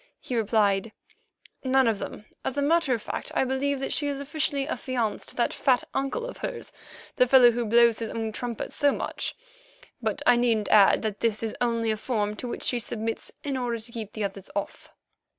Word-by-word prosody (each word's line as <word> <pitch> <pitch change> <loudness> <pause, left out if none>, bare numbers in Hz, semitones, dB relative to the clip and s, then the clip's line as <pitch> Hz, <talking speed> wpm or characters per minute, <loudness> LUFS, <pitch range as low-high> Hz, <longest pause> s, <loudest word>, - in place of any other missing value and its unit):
He 250 - -5
replied: 215 -2 +1 0.7
"None 265 -1 +3
of 220 -3 +1
them. 210 - -7 0.2
As 265 - -3
a - - +2
matter 305 -3 +3
of 225 - -7
fact, - - -5
I - - +3
believe 265 +2 0
that 270 - -2
she 290 - +1
is 280 -1 -2
officially 285 -1 -1
affianced 245 -8 -2
to - - -7
that 240 - +1
fat 255 -2 +2
uncle 275 - -1
of - - -7
hers, - - -5 0.5
the 250 -2 +5
fellow 245 -1 +7
who 235 0 -2
blows 235 0 +5
his 225 -1 -3
own 225 -1 -3
trumpet 235 +1 -4
so 285 0 +3
much, - - -3 0.7
but - - -2
I 245 - +6
needn't 230 -3 +1
add 205 0 +6
that 215 -2 -2
this 225 -1 0
is 225 - -2
only 230 -2 +1
a 215 - -1
form 210 -2 -1
to 250 - -5
which - - -5
she 245 - +1
submits 225 0 -3
in 280 -2 -2
order 245 -2 -1
to 230 +1 -7
keep 220 -4 -6
the 215 - -3
others 195 -1 -5
off." 200 - -4
235 Hz, 205 wpm, -26 LUFS, 220-265 Hz, 0.7 s, fellow